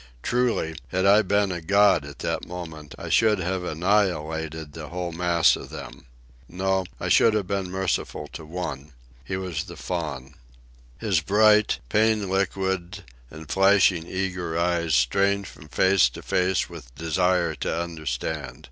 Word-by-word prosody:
Truly, 120 -10 0
had 95 +1 -1
I 100 +2 +6
been 100 0 +1
a 85 -2 -4
god 100 -3 +4
at 75 -2 -10
that - - -2
moment, 80 -4 -8
I - - -7
should 110 -2 +4
have 95 0 -2
annihilated 80 -4 -1
the 80 -1 -7
whole 90 0 -4
mass 85 0 +3
of - - -9
them. - - -10 0.4
No; 95 +1 0
I - - -3
should 110 -1 +5
have 105 -3 0
been 95 -1 -2
merciful 95 -5 -2
to 80 - -9
one. 75 -4 -6 0.3
He 95 +8 -4
was 90 -3 -3
the 85 -4 -10
Faun. 75 -7 -4 0.6
His 95 0 +1
bright, 105 +4 +4
pain 110 - +2
liquid, 95 -2 -1 0.3
and 80 0 -11
flashing 95 -2 +3
eager 90 -3 -3
eyes 85 -2 +1
strained 100 +11 +2
from 75 - -13
face 95 -4 +4
to - - -9
face 90 0 +1
with - - -12
desire 85 +1 +1
to - - -2
understand. 75 -4 -4
90 Hz, 150 wpm, -25 LUFS, 80-95 Hz, 0.6 s, I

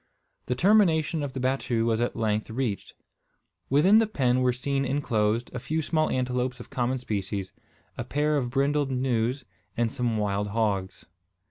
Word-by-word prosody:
The 125 - 0
termination 165 -3 +3
of 140 -2 -4
the 135 - -4
battue 130 -3 0
was 115 0 +1
at 120 - -1
length 110 0 -1
reached. 115 -3 -3 0.7
Within 180 +11 +5
the 225 - +2
pen 130 - +1
were 125 0 +3
seen 135 +2 -1
enclosed 120 -4 0
a 125 - -3
few 160 +6 -2
small 155 +1 +1
antelopes 125 0 -1
of 120 - -11
common 125 +1 0
species, 100 -5 -4 0.5
a - - -1
pair 150 +2 0
of 130 -4 0
brindled 140 +2 +1
gnus, 125 0 0 0.3
and 115 -1 +1
some 120 -4 -1
wild 105 -1 -1
hogs. 100 -3 -2
125 Hz, 160 wpm, -26 LUFS, 115-140 Hz, 0.7 s, Within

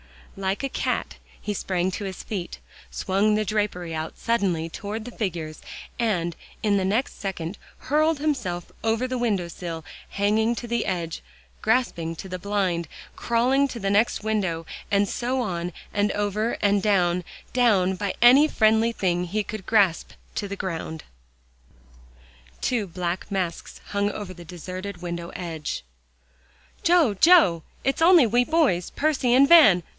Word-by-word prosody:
Like 195 +4 -2
a 275 - -1
cat, - - -2 0.2
he 210 - -2
sprang 185 -2 -1
to 200 +2 -4
his 190 -1 -6
feet, 185 -5 -5 0.3
swung 200 +3 +1
the 215 0 0
drapery 200 -5 -2
out 160 0 -4
suddenly 195 -8 0
toward 210 +5 -5
the 245 - -8
figures, 165 -9 -4 0.4
and 175 -8 0 0.3
in 205 -2 +3
the 190 - 0
next 220 +8 -1
second 190 -1 -4 0.2
hurled 310 +3 +2
himself 235 - -2
over 225 +2 +1
the 255 0 -2
window 210 -8 0
sill, 165 -1 -6 0.3
hanging 220 +3 +1
to 240 - -6
the 235 -1 -1
edge, 170 -4 -3 0.4
grasping 215 -8 0
the 185 +2 -6
blind, 185 -4 -1 0.3
crawling 255 +4 +2
to 255 - -7
the 195 -2 -1
next 210 +1 +2
window, 190 -7 -1 0.2
and 200 -1 +2
so 250 +5 -1
on 175 -5 -3 0.2
and 205 0 +1
over, 210 +2 -1
and 200 -1 +3
down, 180 -3 +2 0.3
down, 200 -7 +3
by 200 +1 -3
any 260 +5 +8
friendly 220 -3 +3
thing 180 -4 0
he 210 +4 -1
could 210 -2 -7
grasp, 200 -7 +2 0.2
to 205 - -3
the 200 - -5
ground. 160 -4 -5 1.6
Two 230 -5 0
black 175 +1 -4
masks 185 -4 -4
hung 200 0 0
over 205 -2 -6
the 175 -1 -12
deserted 185 +2 -7
window 170 -1 -4
edge. 160 - -4 1.0
"Joe 330 -9 +4
Joe! 200 - +5 0.2
it's 270 +4 0
only 335 -4 +7
we 240 +2 +3
boys 285 - +2
Percy 280 -5 +1
and 275 +2 +6
Van. 275 - +7
200 Hz, 150 wpm, -25 LUFS, 180-235 Hz, 1.6 s, any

